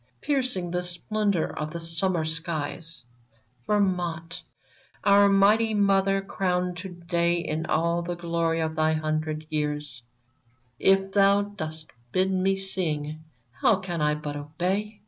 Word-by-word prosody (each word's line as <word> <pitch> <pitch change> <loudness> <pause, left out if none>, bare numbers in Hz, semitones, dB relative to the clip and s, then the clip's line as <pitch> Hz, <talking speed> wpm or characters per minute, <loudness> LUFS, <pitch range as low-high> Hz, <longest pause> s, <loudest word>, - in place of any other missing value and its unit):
Piercing 255 -11 -1
the 180 0 0
splendor 180 +1 -1
of 150 0 -2
the 170 +2 -6
summer 165 0 -1
skies 160 -3 -4 0.3
— 115 +2 -38
Vermont! 175 -5 0 0.6
Our 200 0 +6
mighty 210 +3 +4
mother, 195 -1 +3
crowned 180 -2 -1
to 190 +2 -6
day 170 -1 0
In 160 -1 -3
all 170 +2 +1
the 175 +1 -3
glory 170 -1 0
of 160 0 -2
thy 155 0 +2
hundred 155 0 -2
years, 150 -4 -2 0.8
If 195 0 +3
thou 200 0 +4
dost 160 -6 -7 0.2
bid 190 +1 +2
me 190 +1 +2
sing, 155 -5 -2 0.3
how 210 - +3
can 180 -4 -4
I 150 0 +2
but 150 -1 -5
obey 185 +9 -2
170 Hz, 135 wpm, -26 LUFS, 155-195 Hz, 0.8 s, Our